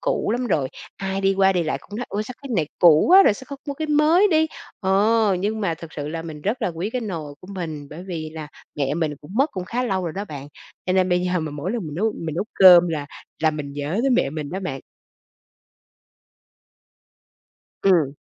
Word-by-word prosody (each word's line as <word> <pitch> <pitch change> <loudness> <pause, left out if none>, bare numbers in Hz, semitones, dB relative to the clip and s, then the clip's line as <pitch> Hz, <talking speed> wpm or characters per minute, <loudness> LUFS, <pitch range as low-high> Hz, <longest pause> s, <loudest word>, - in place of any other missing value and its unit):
cũ - - 0
lắm 245 +1 -1
rồi. 140 - 0 0.3
Ai 195 0 -3
đi 195 0 +2
qua, 195 0 +4
đi 175 -2 +1
lại 155 - -2
cũng 205 - -10
nói: 245 - -4
"Ôi, 210 +1 -2
sao 245 +3 -8
cái 275 - -8
này 155 -4 +1
cũ 160 -4 +6
quá 385 +2 +9
rồi, 205 - +4
sao 260 - -11
không 280 -2 -8
mua 280 - -2
cái 315 +2 -3
mới 315 +7 +4
đi?" 315 0 +4 0.3
Ờ, 205 +1 +3
nhưng 215 +2 -1
mà 170 -5 0
thực 160 0 -11
sự 145 -1 -4
là 165 +1 -4
mình 155 -3 -8
rất 225 +4 -1
là - - +1
quý 175 +5 -4
cái 250 - -2
nồi 165 -10 -5
của 185 - -14
mình, 155 -5 -5
bởi 165 +4 -8
vì 160 -4 -5
là 155 -2 -7 0.3
mẹ 140 0 0
mình 155 -2 -1
cũng 150 +7 -12
mất 275 +5 +2
cũng 185 -2 -4
khá 250 +2 -1
lâu 190 -5 -1
rồi 165 - -3
đó 200 +2 -4
bạn, 145 -5 -8 0.4
cho 185 - +1
nên 185 -1 +3
bây 180 0 +2
giờ 180 -1 0
mà 155 - -4
mỗi 150 +6 -4
lần 220 -9 -3
mình 150 - -7
nấu 215 +6 0
mình 160 -2 -4
nấu 180 - -1
cơm 175 -2 +8
là 150 -3 -3 0.4
là 160 - +4
mình 150 -2 -6
nhớ 145 +7 -3
tới 270 - +2
mẹ 235 - +2
mình 150 -2 -5
đó 190 +2 -4
bạn. 135 -8 -4 3.0
Ừm. 165 -8 +3
180 Hz, 235 wpm, -22 LUFS, 155-215 Hz, 3.0 s, quá